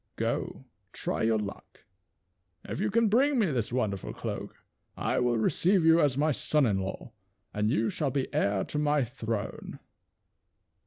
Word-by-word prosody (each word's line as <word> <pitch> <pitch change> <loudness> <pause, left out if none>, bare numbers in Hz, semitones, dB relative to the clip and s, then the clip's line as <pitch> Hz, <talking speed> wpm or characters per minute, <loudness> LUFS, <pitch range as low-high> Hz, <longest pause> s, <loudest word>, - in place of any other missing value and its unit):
Go, - - -3 0.3
try - - -3
your 110 0 +3
luck; 105 -2 -7 0.8
if - - -5
you 205 +2 +1
can 230 +2 +3
bring 265 +6 +3
me 205 -9 +2
this 120 -5 -1
wonder 110 -5 0
ful - - -7
cloak - - -5 0.4
I - - 0
will 120 -1 +2
receive 175 - +2
you 165 +1 +6
as 140 -3 +2
my 150 +2 +2
son 150 +1 +2
in 100 -4 +1
law, 95 +5 -5 0.4
and 105 0 0
you 110 0 +1
shall 150 -4 -1
be 135 0 -1
heir 100 -1 +1
to 150 - -3
my 150 -1 +2
throne." 115 -3 -5
130 Hz, 165 wpm, -29 LUFS, 110-160 Hz, 0.8 s, you